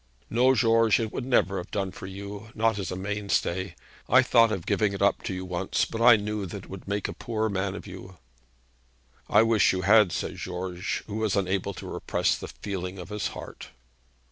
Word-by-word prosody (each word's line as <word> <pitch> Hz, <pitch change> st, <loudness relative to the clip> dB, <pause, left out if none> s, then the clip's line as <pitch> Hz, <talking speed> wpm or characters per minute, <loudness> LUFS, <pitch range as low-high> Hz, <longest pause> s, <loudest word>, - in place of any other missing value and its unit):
'No, 125 Hz, +3 st, +4 dB
George; 115 Hz, -3 st, +4 dB
it 110 Hz, -2 st, -2 dB
would 130 Hz, -, -4 dB
never 100 Hz, -6 st, +2 dB
have 90 Hz, -, -6 dB
done 95 Hz, -2 st, -2 dB
for 95 Hz, -, -9 dB
you; 100 Hz, +3 st, -8 dB
not 115 Hz, -1 st, +1 dB
as 95 Hz, -, -3 dB
a -, -, -3 dB
mainstay. 95 Hz, -1 st, -2 dB, 0.3 s
I -, -, +6 dB
thought 115 Hz, -1 st, +5 dB
of 95 Hz, -6 st, -3 dB
giving 105 Hz, -2 st, +1 dB
it 100 Hz, -, -5 dB
up 100 Hz, -, +3 dB
to -, -, -2 dB
you 95 Hz, 0 st, -5 dB
once, 90 Hz, +1 st, -1 dB
but 115 Hz, -, -5 dB
I 120 Hz, 0 st, +8 dB
knew 105 Hz, -1 st, -3 dB
that 95 Hz, +2 st, -7 dB
it -, -, -15 dB
would 95 Hz, 0 st, -9 dB
make 100 Hz, 0 st, -1 dB
a -, -, -5 dB
poor 110 Hz, -1 st, -2 dB
man 95 Hz, -1 st, -2 dB
of -, -, -8 dB
you.' 95 Hz, -1 st, -10 dB, 1.1 s
'I -, -, +6 dB
wish 115 Hz, -2 st, +4 dB
you 95 Hz, -, -1 dB
had,' 105 Hz, -1 st, +6 dB
said -, -, -3 dB
George, 90 Hz, 0 st, -4 dB
who 105 Hz, 0 st, -5 dB
was 110 Hz, -3 st, 0 dB
unable 100 Hz, 0 st, -1 dB
to -, -, -8 dB
repress -, -, 0 dB
the -, -, -7 dB
feeling 95 Hz, -2 st, -5 dB
of 90 Hz, +1 st, -8 dB
his 105 Hz, -1 st, -2 dB
heart. -, -, -9 dB
100 Hz, 210 wpm, -27 LUFS, 95-110 Hz, 1.1 s, I